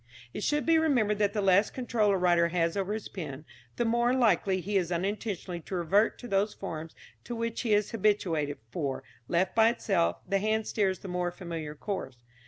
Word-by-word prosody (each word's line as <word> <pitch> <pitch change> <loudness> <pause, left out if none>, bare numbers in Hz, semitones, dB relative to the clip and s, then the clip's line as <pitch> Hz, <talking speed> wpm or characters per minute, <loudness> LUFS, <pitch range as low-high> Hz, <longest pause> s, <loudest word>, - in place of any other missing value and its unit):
It - - -5
should 295 +6 0
be 325 -1 +5
remembered 240 -10 +2
that 205 -1 +2
the 210 - -1
less 195 +2 +4
control 235 -4 0
a 195 - +3
writer 175 -2 +3
has 170 -1 0
over 195 0 -1
his 220 -1 -4
pen, 150 -5 -7 0.3
the 240 - 0
more 235 +2 +2
likely 215 -6 +3 0.2
is 180 -3 +2
he 175 - 0
unintentionally 190 -1 -3
to 185 - -6
revert 195 +6 +2
to 245 - -9
those 200 0 +1
forms 160 0 -6 0.3
to 240 - -5
which 230 0 -2
he 220 -4 +3
is 205 -1 0
habituated, 180 -9 +1
for, 140 -2 -3 0.2
left 185 +2 +1
by 225 0 +5
itself, 195 -7 0
the 195 0 +1
hand 215 +2 0
steers 195 -3 0
the - - -7
more 180 -1 -1
familiar 165 -4 -6
course. 150 - -5
195 Hz, 195 wpm, -29 LUFS, 175-220 Hz, 0.3 s, be